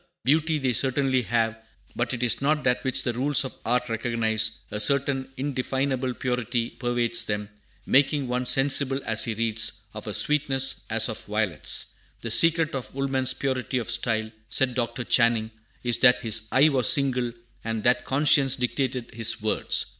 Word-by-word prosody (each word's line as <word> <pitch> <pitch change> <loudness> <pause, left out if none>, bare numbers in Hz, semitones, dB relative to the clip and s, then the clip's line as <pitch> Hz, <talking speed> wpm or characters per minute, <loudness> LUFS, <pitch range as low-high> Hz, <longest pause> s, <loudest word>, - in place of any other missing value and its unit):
Beauty 155 +3 +1
they 130 -4 -1
certainly 130 +1 +1
have, 115 -1 -1 0.4
but 120 0 -2
it 125 -1 -3
is 120 +1 0
not 150 +2 0
that 125 -1 0
which 130 - -1
the 120 - -2
rules 135 +3 +2
of 130 - -7
art 125 +1 0
recognize; 110 -1 -1 0.2
a 105 - -4
certain 135 +3 +1
indefinable 130 -1 -2
purity 125 -1 -2
pervades 120 -1 -1
them, 105 0 -4 0.4
making 140 0 +2
one 125 0 -2
sensible, 135 0 +2
as 110 0 0
he 115 - -3
reads, 110 -1 0 0.2
of 105 0 -9
a 105 - -4
sweetness 135 -3 +1
as 115 0 +2
of 110 - -6
violets. 105 -8 -1 0.3
"The 115 - -4
secret 165 +4 +4
of 130 -1 -6
Woolman's 135 -1 0
purity 130 -1 -2
of 120 -1 -3
style," 110 -2 -1 0.2
said 130 0 +2
Dr. 120 0 -3
Channing, 115 -2 +2 0.3
"is 120 -1 +2
that 125 -1 +5
his 110 -1 -1
eye 145 +4 +5
was 135 -1 +4
single, 130 -5 +2 0.3
and 115 -1 -4
that 125 +1 +2
conscience 135 -1 +3
dictated 125 -1 -3
his 115 0 +1
words." - - +1
125 Hz, 165 wpm, -25 LUFS, 115-135 Hz, 0.4 s, that